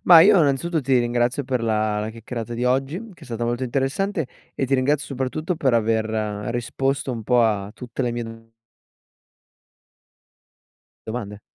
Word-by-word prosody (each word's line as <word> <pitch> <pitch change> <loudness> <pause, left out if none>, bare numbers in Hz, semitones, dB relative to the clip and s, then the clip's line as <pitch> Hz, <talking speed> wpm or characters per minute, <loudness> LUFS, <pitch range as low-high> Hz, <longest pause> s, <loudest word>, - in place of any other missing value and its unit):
Ma - - +12
io 200 -3 +6
innanzitutto 155 +4 +1
ti 130 -2 +3
ringrazio 120 +3 +1
per 125 -2 -1
la 110 -1 +1
la 110 +1 -3
chiacchierata 115 +1 -6
di 120 +1 -2
oggi 135 +6 +1 0.2
che 170 - -23
è - - -8
stata 120 -2 -3
molto 120 +2 -1
interessante, 140 +7 0 0.3
e 135 - 0
ti 135 - +2
ringrazio 145 +3 +1
soprattutto 140 +6 -2
per 140 -6 +1
aver 110 -1 +2 0.5
risposto 135 +3 -1
un 115 -2 -5
po' 125 +3 +3
a 105 -2 0
tutte 125 +1 -5
le 120 - 0
mie 120 0 -3
do 115 0 -11 2.6
domande. 105 -3 -5
125 Hz, 160 wpm, -23 LUFS, 115-135 Hz, 2.6 s, Ma